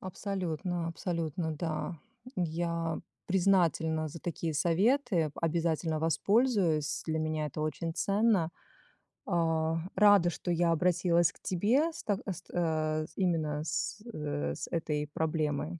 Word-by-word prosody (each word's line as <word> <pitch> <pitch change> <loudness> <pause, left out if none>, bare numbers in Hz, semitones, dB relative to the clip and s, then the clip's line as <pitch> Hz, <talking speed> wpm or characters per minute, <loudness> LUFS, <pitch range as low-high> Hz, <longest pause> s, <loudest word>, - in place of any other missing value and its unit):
Абсолютно, 180 -3 -3
абсолютно. 165 -1 -2
Да, 155 +1 -3 0.4
я 170 -1 -1 0.3
признательна 170 -4 +2
за 165 - -8
такие 165 -2 -3
советы, 190 - +2
о - - -15
обязательно 165 -1 0
воспользуюсь. 170 - +2
Для 160 0 0
меня 155 -1 -1
это 150 +2 -5
очень 155 +2 -2
ценно. 200 -4 +2 0.8
А, 165 -3 +1 0.2
рада, 205 -4 +6
что 175 +1 -3
я 170 0 +2
обратилась 175 +1 +3
к - - -23
тебе 235 - +2
с - - -8
так 205 -2 0
с 180 - -4
та 155 -2 0
э, - - -6
именно 155 -5 0
с, 160 +6 -2
э, 75 - -2
с - - -5
этой 150 -3 -1
проблемой. 155 +1 -1
165 Hz, 130 wpm, -31 LUFS, 155-180 Hz, 0.8 s, рада